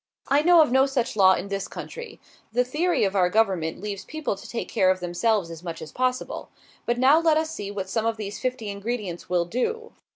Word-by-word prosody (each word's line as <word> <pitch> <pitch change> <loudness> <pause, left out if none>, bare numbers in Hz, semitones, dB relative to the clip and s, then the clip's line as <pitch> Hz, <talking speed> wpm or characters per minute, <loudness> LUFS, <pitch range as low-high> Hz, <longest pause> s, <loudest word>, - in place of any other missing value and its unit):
I 280 +2 +4
know 345 +1 +6
of 295 - -2
no 265 +1 +4
such 265 -5 -1
law 190 -2 +6
in 200 - -5
this 195 -1 -3
country. 475 0 -8 0.3
The 245 +3 +2
theory 310 +8 0
of 200 0 0
our 180 -2 +3
government 185 -6 +1
leaves 200 0 -5
people 310 -8 -3
to - - -12
take 235 - -4
care 190 -4 +2
of 185 0 +2
themselves 180 +1 0
as 165 -1 -9
much 170 -2 -6
as 155 - -9
possible. 255 0 -2 0.4
But 240 0 +1
now 270 +5 +6
let 325 -2 +3
us 315 0 -1
see 205 -10 -5
what 200 -2 -4
some 225 +3 -1
of 225 -1 -1
these 205 -1 -5
fifty 250 -4 -3
ingredients 200 -4 -5
will 175 -1 +2
do. 450 - -2
220 Hz, 225 wpm, -25 LUFS, 190-265 Hz, 0.4 s, know